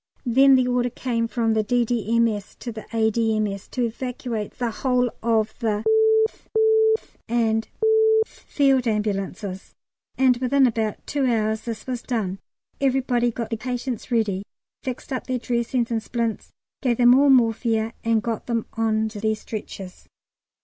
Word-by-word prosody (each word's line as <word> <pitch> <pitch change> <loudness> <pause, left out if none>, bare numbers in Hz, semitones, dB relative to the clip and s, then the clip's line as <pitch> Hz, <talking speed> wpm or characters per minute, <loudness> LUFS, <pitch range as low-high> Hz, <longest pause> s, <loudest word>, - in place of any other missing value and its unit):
Then 265 +3 +6
the 255 -1 +3
order 245 0 +1
came 230 -1 -2
from 230 -1 0
the 220 - +2
D.D.M.S. 230 -2 0
to 240 - -7
the 220 -1 -9
A.D.M.S. 220 -3 0
to 250 - -2
evacuate 235 -2 -4
the 240 -2 -1
whole 250 0 0
of 220 -1 +1
the 215 -3 -1 0.4
th, - - -26 0.5
th, - - -25 0.2
and 225 -1 +1
th - - -36 0.7
Field 270 -3 +2
Ambulances, 200 -2 -3 0.4
and 260 -2 +4
within 265 +2 +3
about 225 -3 -1
two 280 -2 0
hours 220 -2 0
this 230 -3 -5
was 250 -2 -3
done. 200 -6 -3 0.4
Everybody 255 -3 +2
got 230 -1 -5
the 225 - -1
patients 245 0 -4
ready, 215 -6 0 0.4
fixed 260 +1 -5
up 255 - -4
their 255 -1 0
dressings 240 0 -1
and 225 -1 0
splints, 230 -1 -3 0.3
gave 245 -4 +1
them 245 0 +6
all 280 +2 +5
morphia, 225 -3 +2
and 225 -2 +1
got 230 -2 -3
them 230 -2 -1
on 220 -1 +1
to 215 -1 -8
their 220 0 +1
stretchers. 200 -4 -8
230 Hz, 150 wpm, -23 LUFS, 220-250 Hz, 0.7 s, Then